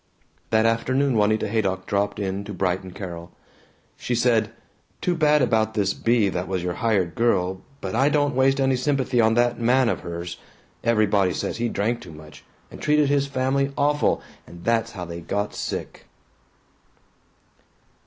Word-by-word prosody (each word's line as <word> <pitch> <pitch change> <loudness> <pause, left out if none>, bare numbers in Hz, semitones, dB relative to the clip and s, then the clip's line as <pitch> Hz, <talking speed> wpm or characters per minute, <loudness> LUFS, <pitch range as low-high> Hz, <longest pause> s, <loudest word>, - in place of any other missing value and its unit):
That 110 0 +3
afternoon 130 +4 +1
Juanita 110 +1 +2
Haydock 95 -4 -1
dropped 100 0 -1
in 100 -1 -3
to 105 -1 -7
brighten 95 0 -1
Carol. 85 -2 -8 0.7
She 125 - -2
said, 115 -2 +2 0.5
"Too 180 - 0
bad 150 -3 +3
about 110 -3 +1
this 100 -2 +1
Bea 115 -3 +2
that 90 0 -3
was 95 -2 -2
your 90 -1 -2
hired 100 -7 +1
girl. 95 -4 +1 0.2
But 95 -1 -4
I 135 +5 +3
don't 145 -1 +1
waste 135 +1 +3
any 135 -1 +2
sympathy 130 -2 +1
on 110 0 +3
that 120 0 +2
man 125 +1 +3
of - - -1
hers. 85 0 -6 0.5
Everybody 105 -5 +2
says - - -3
he 120 0 -1
drank 115 +3 -1
too 85 - -11
much, 75 -2 -13 0.3
and - - -11
treated 150 -1 +3
his 140 -1 +2
family 135 +1 0
awful, 145 +1 +1 0.2
and 85 0 -12
that's 115 -1 0
how 90 -4 -6
they 85 0 -7
got 100 +5 -2
sick." - - -5
110 Hz, 165 wpm, -24 LUFS, 95-130 Hz, 0.7 s, That